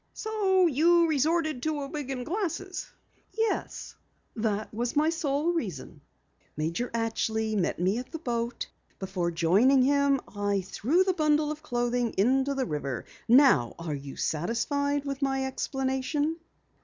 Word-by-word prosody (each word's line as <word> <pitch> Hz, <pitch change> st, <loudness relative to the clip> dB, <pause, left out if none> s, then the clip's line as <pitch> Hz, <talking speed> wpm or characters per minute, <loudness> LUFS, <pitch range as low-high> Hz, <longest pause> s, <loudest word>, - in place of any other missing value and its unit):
"So 395 Hz, -4 st, +2 dB
you 335 Hz, +3 st, +4 dB
resorted 310 Hz, -1 st, +1 dB
to 310 Hz, +1 st, -1 dB
the 280 Hz, -, -3 dB
wig 290 Hz, -2 st, -5 dB
and 255 Hz, -2 st, -3 dB
glasses?" 375 Hz, 0 st, -3 dB, 0.5 s
"Yes, 450 Hz, 0 st, -2 dB, 0.4 s
that 215 Hz, -2 st, -2 dB
was 235 Hz, +4 st, -2 dB
my 305 Hz, +2 st, +3 dB
sole 315 Hz, 0 st, 0 dB
reason. 180 Hz, -, -5 dB, 0.6 s
Major 165 Hz, +11 st, -2 dB
Atchley 220 Hz, -1 st, -1 dB
met 185 Hz, -5 st, 0 dB
me 190 Hz, +6 st, +1 dB
at 250 Hz, -, -8 dB
the 325 Hz, -, -4 dB
boat. 235 Hz, -5 st, -3 dB, 0.3 s
Before 185 Hz, -3 st, -2 dB
joining 200 Hz, +11 st, +4 dB
him 280 Hz, 0 st, +3 dB, 0.2 s
I 205 Hz, -1 st, 0 dB
threw 265 Hz, -, +1 dB
the 375 Hz, 0 st, +1 dB
bundle 305 Hz, -2 st, +2 dB
of 305 Hz, 0 st, -6 dB
clothing 245 Hz, -4 st, -1 dB
into 265 Hz, +7 st, +2 dB
the 265 Hz, -1 st, 0 dB
river. 140 Hz, -5 st, -4 dB, 0.2 s
Now 240 Hz, -, +5 dB
are 165 Hz, -2 st, -4 dB
you 140 Hz, -1 st, -7 dB
satisfied 285 Hz, -, -1 dB
with 275 Hz, 0 st, -4 dB
my 270 Hz, -1 st, 0 dB
explanation?" 270 Hz, +4 st, -1 dB
265 Hz, 145 wpm, -28 LUFS, 215-305 Hz, 0.6 s, Now